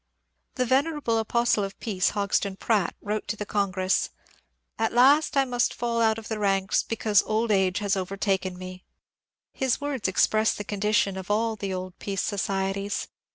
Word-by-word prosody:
The 255 - +1
venerable 270 -2 +1
apostle 235 -1 +1
of 195 0 -6
Peace, 190 -5 0
Hodgson 200 -1 -1
Pratt, 205 -3 0
wrote 210 +1 -3
to - - -2
the 210 - -5
Congress, 190 -2 0 0.2
^^ 225 - -11
At 225 - 0
last 280 +5 +5
I 270 - +4
must 245 -1 0
fall 235 -1 -1
out 220 -1 +3
of 225 - -8
the 220 -1 -3
ranks, 195 -1 +2
because 215 -3 +2
old 220 +1 0
age 190 -2 +2
has 205 0 0
overtaken 190 -1 -1
me." 185 0 -9 0.7
His 265 -2 0
words 285 -7 -2
express 215 +3 +2
the 205 - -5
condition 205 -1 0
of 190 0 -7
all 220 +2 +1
the 200 -2 -4
old 185 0 -6
peace 195 -1 -2
societies. 195 0 -2
205 Hz, 170 wpm, -26 LUFS, 195-230 Hz, 0.7 s, last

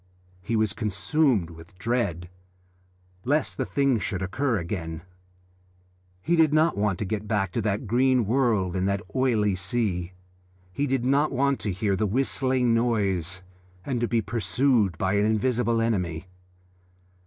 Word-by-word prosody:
He 115 +6 -2
was 110 -4 +1
consumed 105 - +1
with 85 +3 -14
dread 95 -5 -1 1.0
lest 150 +4 0
the - - -2
thing 140 -4 +1
should 95 -2 -3
occur 125 +5 0
again. 85 -3 -5 1.2
He 170 - +2
did 160 -2 +4
not 160 +1 +3
want 100 -3 0
to 105 - -3
get 105 +2 -3
back 100 -4 0
to 115 - -1
that 105 +3 -1
green 125 +2 +2
world 110 -6 +1
and 95 +1 0
that 100 +1 -1
oily 115 -6 +2
sea; 95 -2 -2 0.6
he 145 +7 -1
did 130 -2 0
not 140 +3 +2
want 140 +1 +1
to 105 - -2
hear 100 +1 0
the 105 +3 0
whistling 130 +1 +1
noise, 95 -7 0 0.4
and 125 -4 -2
to 120 - +1
be 115 -1 0
pursued 115 -3 +1
by 95 +2 0
an 100 0 +2
invisible 115 +1 +1
enemy. 90 -8 -1
110 Hz, 150 wpm, -25 LUFS, 95-125 Hz, 1.2 s, did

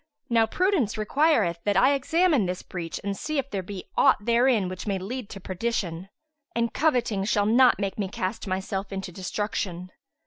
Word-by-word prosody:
Now 225 -1 +4
prudence 350 - +1
requireth 215 - +2
that 205 -2 +1
I 260 +8 +5
examine 290 - +2
this 180 0 -4
breach 165 -5 -5
and 200 0 -2
see 310 +8 -3
if 275 0 -2
there 195 - -2
be 185 0 -8
aught 205 - +4
therein 235 -3 +3
which 185 +3 -6
may 200 -2 0
lead 220 +4 -5
to 195 - -8
perdition; 185 -2 -3 0.5
and 235 -1 0
coveting 240 -10 +1
shall 205 0 +1
not 245 +4 +5
make 200 0 -3
me 200 - 0
cast 190 +2 -4
myself 190 +1 -3
into 195 -1 -5
destruction." 185 -1 -4
205 Hz, 175 wpm, -26 LUFS, 190-245 Hz, 0.5 s, I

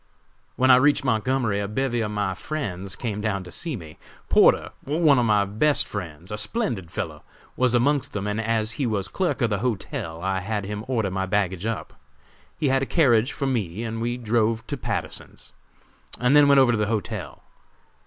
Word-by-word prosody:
"When 130 +1 +4
I 125 - +8
reached 145 +3 +3
Montgomery 115 -3 +1
a 100 - -2
bevy 120 +2 -1
of 105 - -1
my 105 -2 -1
friends 95 - -4
came 105 -4 -4
down 100 -3 -1
to 90 - -11
see 165 -5 -1
me. 80 -7 -10 0.3
Porter, - - +4
one 150 -2 +3
of 120 - +2
my 105 -2 +3
best 115 +9 +1
friends 90 -2 -7
a 105 - -3
splendid 115 - -2
fellow - - -5 0.3
was 125 -1 +2
amongst 140 +3 +2
them, 105 -1 -4
and 105 +2 -1
as 110 0 0
he 130 - +1
was 100 -5 -1
clerk 175 - -1
of 115 - +1
the 100 - 0
hotel 95 -8 -3
I 95 0 0
had 100 +1 -3
him 105 +1 -5
order 110 -7 0
my 95 0 -2
baggage 95 0 0
up. 115 -2 -4 0.6
He 145 - +1
had 135 0 +2
a 135 - -1
carriage 125 -6 +3
for 140 - -3
me 110 -6 -2
and 115 0 -4
we 120 +1 -1
drove 115 -1 0
to 145 - -4
Patterson's, 135 - -5 0.7
and 125 +3 +3
then 145 -1 +7
went 140 0 +6
over 130 -2 +5
to 115 - +1
the 105 - +1
hotel. 105 -7 -4
110 Hz, 195 wpm, -24 LUFS, 100-130 Hz, 0.7 s, I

